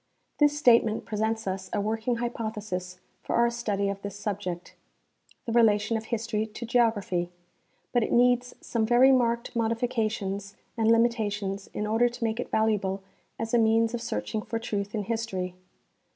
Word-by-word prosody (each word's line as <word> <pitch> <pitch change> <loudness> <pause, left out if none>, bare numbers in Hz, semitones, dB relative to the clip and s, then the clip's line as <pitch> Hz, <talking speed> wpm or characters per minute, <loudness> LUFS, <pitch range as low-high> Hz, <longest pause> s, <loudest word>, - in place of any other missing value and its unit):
This 295 -1 +4
state 245 -6 +6
ment 220 -1 -3
presents 220 +1 -1
us 190 0 -3
a - - -1
Avorldng 220 +3 -1
hj^pothesis 215 -6 -4 0.2
for - - -2
our 235 0 +4
study 210 -4 -1
of 200 0 -3
this 200 -1 -6
subject 195 -4 -4 0.4
— - - -33
the 235 - -3
relation 225 -1 +3
of 220 0 -3
history 220 -1 -2
to 220 +2 -7
geography, 220 -7 +1 0.3
— - - -43
but 245 - +4
it - - -1
needs 245 0 +3
some 230 -2 -1
very 245 +4 +6
marked 235 -2 +1
modifications 220 -4 -1 0.2
and 225 -1 +3
limitations 210 -4 +1
in 210 - -3
order 225 +3 +3
to 240 0 -7
make 225 +1 -1
it - - -3
valuable 200 -3 0 0.3
as 225 +1 -4
a 240 - +5
means 225 +1 +3
of 240 - -2
searching 225 -1 -3
for 230 - -3
truth 205 -2 -3
in 210 - -1
history. 200 -5 -3
220 Hz, 170 wpm, -27 LUFS, 205-235 Hz, 0.4 s, state